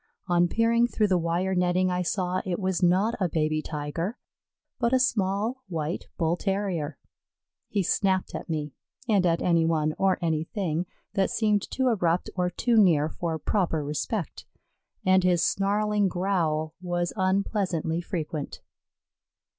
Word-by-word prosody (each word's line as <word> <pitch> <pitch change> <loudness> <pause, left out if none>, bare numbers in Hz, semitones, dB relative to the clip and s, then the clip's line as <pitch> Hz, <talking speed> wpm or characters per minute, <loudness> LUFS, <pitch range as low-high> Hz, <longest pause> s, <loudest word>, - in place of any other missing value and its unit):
On 175 -1 +3
peering 230 +4 +3
through 215 -3 +1
the 185 - +3
wire 170 +3 0
netting 180 0 +2
I 180 0 0
saw 180 0 -1
it 180 -2 -2
was 190 -2 -1
not 185 +6 +3
a 185 -3 +1
baby 155 -1 0
Tiger 160 - -4 0.6
but 235 0 +1
a 260 - +5
small 220 0 0
white 165 -2 -3
Bull 165 0 +1
terrier. 180 -6 -2 0.7
He 200 -2 0
snapped 190 +1 +1
at - - -6
me 150 -3 -3 0.3
and 200 -5 +3
at 165 0 +1
any 170 -2 +3
one 155 -2 +1
or 190 -1 +3
anything 165 +1 -1 0.3
that 195 -2 +1
seemed 210 -3 +1
too 260 -1 +1
abrupt 180 -6 +1
or 180 -1 +1
too 230 +6 +1
near 160 -7 +5
for 165 -1 -3
proper 165 -4 0
respect, 155 - -3 0.6
and 185 0 +4
his 180 -2 +3
snarling 205 +1 +1
growl 170 -5 0
was 175 -1 -2
unpleasantly 185 -4 0
frequent. 155 -5 -5
180 Hz, 145 wpm, -26 LUFS, 165-200 Hz, 0.7 s, a